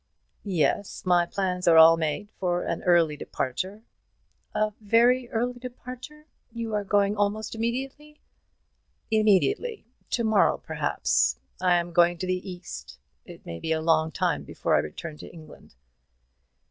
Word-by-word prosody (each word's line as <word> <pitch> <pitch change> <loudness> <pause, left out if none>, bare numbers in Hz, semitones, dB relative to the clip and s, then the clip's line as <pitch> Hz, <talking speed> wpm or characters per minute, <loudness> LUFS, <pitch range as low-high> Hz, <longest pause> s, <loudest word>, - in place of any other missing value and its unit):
"Yes, 190 +1 -1
my 175 -1 +3
plans 180 -1 -2
are 165 -1 +7
all 160 +1 +9
made 165 +6 -3
for 175 -1 0
an - - -3
early 170 -4 +4
departure." 185 - -4 0.7
"A 215 0 +1
very 240 +4 +3
early 245 +2 -2
departure? 255 +4 -10 0.3
You 230 -1 -5
are 210 -1 0
going 200 0 +2
almost 205 +1 -1
immediately?" 270 +6 -4 0.9
"Immediately, 220 - +2 0.2
to 235 - 0
morrow, 220 -2 +3
perhaps. 60 +1 0 0.2
I 180 -1 +4
am 175 0 -1
going 175 0 +4
to 185 - -4
the 185 +1 -3
East. 65 - -9 0.3
It - - -13
may 85 0 -7
be 160 - -4
a 160 - +1
long 160 0 +2
time - - 0
before - - -2
I - - +4
return 150 - -6
to - - -9
England." 155 - -15
190 Hz, 145 wpm, -26 LUFS, 170-225 Hz, 0.9 s, all